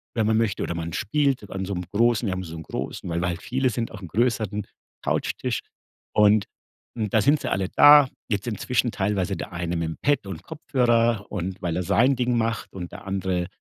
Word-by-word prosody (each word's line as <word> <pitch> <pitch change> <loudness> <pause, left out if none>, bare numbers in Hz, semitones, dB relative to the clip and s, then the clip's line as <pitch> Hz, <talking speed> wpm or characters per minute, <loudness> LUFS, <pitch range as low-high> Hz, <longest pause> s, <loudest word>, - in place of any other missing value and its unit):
wenn 110 -2 +1
man 110 0 +3
möchte 110 -4 0
oder 85 - -3
man 85 0 -4
spielt 135 - 0
an 95 0 -4
so 100 - -3
'nem 90 0 -4
großen 115 +2 +2
wir 95 - 0
haben 95 0 -4
so 85 -2 -8
'n 80 - -7
großen 85 - -5
weil 85 +1 -1
wir 90 - 0
halt 90 0 -3
viele 130 +1 0
sind, 115 0 -3
auch 105 - -9
'n 90 - -7
größeren 105 +1 0 0.4
Couchtisch. - - -1 0.5
Und 105 -1 +5 0.5
n 110 -2 -1
da 110 - +3
sind 145 +7 +4
sie - - -3
alle 95 -1 -1
da 145 -2 +8 0.2
jetzt 105 +1 -1
inzwischen 120 +2 0
teilweise 95 -2 -1
der - - -6
eine 85 0 -2
mit 85 -1 -1
dem 80 - -5
Pad 145 -7 +1
und 90 -3 -7
Kopfhörer 120 - +1
und 95 0 -4
weil 85 -2 -1
er 90 - -1
sein 125 +9 +3
Ding 125 -1 +1
macht 115 0 -1
und 90 -2 -6
der - - -10
andere 95 -2 -1
105 Hz, 220 wpm, -24 LUFS, 90-120 Hz, 0.5 s, da